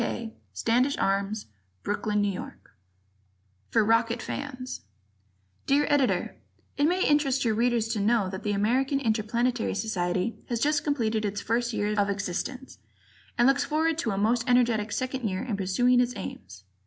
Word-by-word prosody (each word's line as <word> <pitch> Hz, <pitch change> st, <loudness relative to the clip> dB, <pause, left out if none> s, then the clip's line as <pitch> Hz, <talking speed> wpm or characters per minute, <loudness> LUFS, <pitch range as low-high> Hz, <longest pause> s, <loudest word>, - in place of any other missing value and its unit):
Kay, 230 Hz, -1 st, -3 dB, 0.2 s
Standish 250 Hz, +5 st, +1 dB
Arms, 200 Hz, +2 st, 0 dB, 0.4 s
Brooklyn, 205 Hz, 0 st, 0 dB
N. 200 Hz, -, 0 dB
Y. -, -, -8 dB, 1.2 s
For 205 Hz, -, +3 dB
Rocket 230 Hz, +2 st, +2 dB
Fans 255 Hz, 0 st, -5 dB, 0.9 s
Dear 285 Hz, +2 st, +3 dB
Editor: 285 Hz, -3 st, +1 dB, 0.4 s
It 285 Hz, -, +2 dB
may 360 Hz, +4 st, +2 dB
interest 280 Hz, -3 st, +2 dB
your 225 Hz, -, +2 dB
Readers 235 Hz, 0 st, +1 dB
to 225 Hz, -2 st, -1 dB
know 210 Hz, -1 st, +2 dB
that 190 Hz, 0 st, -5 dB
the 210 Hz, -, -1 dB
American 255 Hz, +7 st, +1 dB
Interplanetary 235 Hz, 0 st, 0 dB
Society 185 Hz, 0 st, -1 dB
has 235 Hz, -2 st, -1 dB
just 295 Hz, +3 st, +1 dB
completed 225 Hz, -7 st, 0 dB
its 205 Hz, 0 st, -2 dB
first 235 Hz, +3 st, 0 dB
year 210 Hz, -1 st, -1 dB
of 200 Hz, 0 st, +2 dB
existence, 200 Hz, +7 st, -4 dB, 0.6 s
and 240 Hz, -, +5 dB
looks 275 Hz, +1 st, +3 dB
forward 320 Hz, +1 st, 0 dB
to 235 Hz, -, -1 dB
a 195 Hz, -, -1 dB
most 230 Hz, +4 st, +2 dB
energetic 235 Hz, -4 st, +3 dB
second 255 Hz, -2 st, -2 dB
year 185 Hz, -1 st, -3 dB
in 240 Hz, -5 st, -2 dB
pursuing 225 Hz, +6 st, +2 dB
its 250 Hz, 0 st, -1 dB
aims. 100 Hz, -, -8 dB
230 Hz, 155 wpm, -27 LUFS, 205-255 Hz, 1.2 s, and